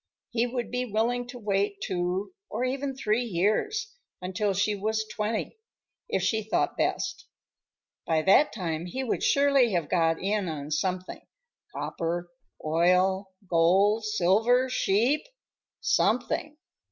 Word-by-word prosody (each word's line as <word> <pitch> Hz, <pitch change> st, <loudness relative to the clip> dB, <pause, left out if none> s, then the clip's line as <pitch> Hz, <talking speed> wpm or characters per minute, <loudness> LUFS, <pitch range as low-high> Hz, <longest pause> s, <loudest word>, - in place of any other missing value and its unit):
He 235 Hz, 0 st, +1 dB
would 240 Hz, -2 st, -4 dB
be 250 Hz, 0 st, -1 dB
willing 240 Hz, +3 st, 0 dB
to 245 Hz, 0 st, -8 dB
wait 200 Hz, -2 st, 0 dB
two, 180 Hz, -, -2 dB, 0.2 s
or -, -, -2 dB
even 270 Hz, +1 st, -2 dB
three 220 Hz, -2 st, 0 dB
years, 245 Hz, -, 0 dB, 0.3 s
until 190 Hz, +3 st, -1 dB
she 200 Hz, +2 st, +1 dB
was 215 Hz, +2 st, -1 dB
twenty, 215 Hz, -, -3 dB, 0.5 s
if -, -, 0 dB
she 220 Hz, -1 st, +1 dB
thought 215 Hz, +1 st, 0 dB
best. 345 Hz, -2 st, -2 dB, 0.8 s
By 160 Hz, -1 st, +2 dB
that 200 Hz, -, +5 dB
time 170 Hz, -4 st, -3 dB
he 260 Hz, +9 st, -3 dB
would 245 Hz, -, -1 dB
surely 275 Hz, -5 st, +4 dB
have 170 Hz, -5 st, -1 dB
got 165 Hz, -2 st, +2 dB
in 200 Hz, -1 st, -1 dB
on 150 Hz, -1 st, -5 dB
something: 185 Hz, +3 st, -2 dB, 0.5 s
copper, 175 Hz, +1 st, -3 dB, 0.3 s
oil, 180 Hz, +4 st, +2 dB, 0.2 s
gold, 190 Hz, +6 st, +3 dB
silver, 215 Hz, +5 st, +2 dB
sheep,—something. 255 Hz, -, -1 dB
210 Hz, 125 wpm, -27 LUFS, 180-245 Hz, 0.8 s, that